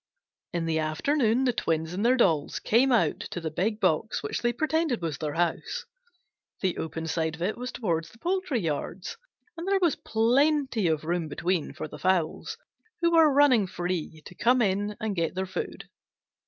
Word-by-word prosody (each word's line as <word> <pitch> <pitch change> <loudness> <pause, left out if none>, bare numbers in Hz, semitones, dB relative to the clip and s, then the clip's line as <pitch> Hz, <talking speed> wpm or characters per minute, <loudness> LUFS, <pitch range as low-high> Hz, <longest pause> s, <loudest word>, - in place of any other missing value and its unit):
In 170 -1 -2
the 160 -1 0
afternoon 225 - +1
the 250 -2 +2
twins 160 -6 -1
and 195 +4 -2
their 250 +2 +4
dolls 160 - +2
came 255 +5 +3
out 240 - +2
to - - -5
the 160 -2 -4
big 210 +7 -1
box 220 +4 +1
which - - -3
they 240 - +2
pretended 310 0 0
was 165 -4 -3
their 150 -2 -3
house. 170 -1 -1 0.8
The 185 -2 0
open 160 +1 -4
side 160 -1 -1
of 165 - -14
it 200 +4 0
was 250 +1 -5
toward 165 -8 -1
the 170 - -16
poultry 355 - -1
yards, 165 +3 -3 0.4
and 335 +2 -6
there 395 0 +3
was 345 -6 +2
plenty 250 - +2
of 155 -2 0
room 170 0 -1
between 170 +3 -1
for - - -5
the - - -10
fowls 185 - 0 0.4
who 340 0 +3
were 325 -3 +6
running 270 -7 +5
free 175 -3 -4
to - - -10
come 245 +7 +3
in 205 -1 0
and 220 -3 -2
get 165 -1 -1
their 190 +1 -1
food. 185 -1 -5
195 Hz, 185 wpm, -27 LUFS, 165-250 Hz, 0.8 s, were